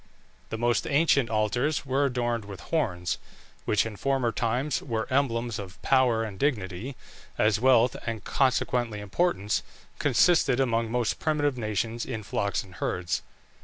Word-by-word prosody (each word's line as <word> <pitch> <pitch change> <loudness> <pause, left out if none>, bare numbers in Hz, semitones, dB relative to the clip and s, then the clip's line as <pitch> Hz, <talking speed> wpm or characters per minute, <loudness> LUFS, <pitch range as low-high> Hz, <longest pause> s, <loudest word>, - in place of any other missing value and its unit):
The 110 - -3
most 120 +1 +1
ancient 140 -4 +3
altars 120 +8 0
were 135 +2 +1
adorned 120 -4 -1
with 100 -3 -8
horns, 90 - -1 0.5
which 105 0 +2
in 110 -2 -6
former 135 -2 +1
times 125 +3 -1
were 115 -4 -2
emblems 120 -5 0
of 100 -1 -9
power 125 -4 +3
and 100 -4 -6
dignity, 115 -2 -1 0.4
as 105 0 +3
wealth, 125 -1 +4
and 115 -2 -3
consequently 125 -4 +1
importance, 105 - 0 0.4
consisted 155 -7 +4
among 115 -3 +1
most 120 -1 0
primitive 145 -3 +1
nations 115 0 -2
in 110 -1 -5
flocks 100 0 -1
and 95 -2 -15
herds. 90 -1 -1
115 Hz, 140 wpm, -27 LUFS, 105-135 Hz, 0.5 s, wealth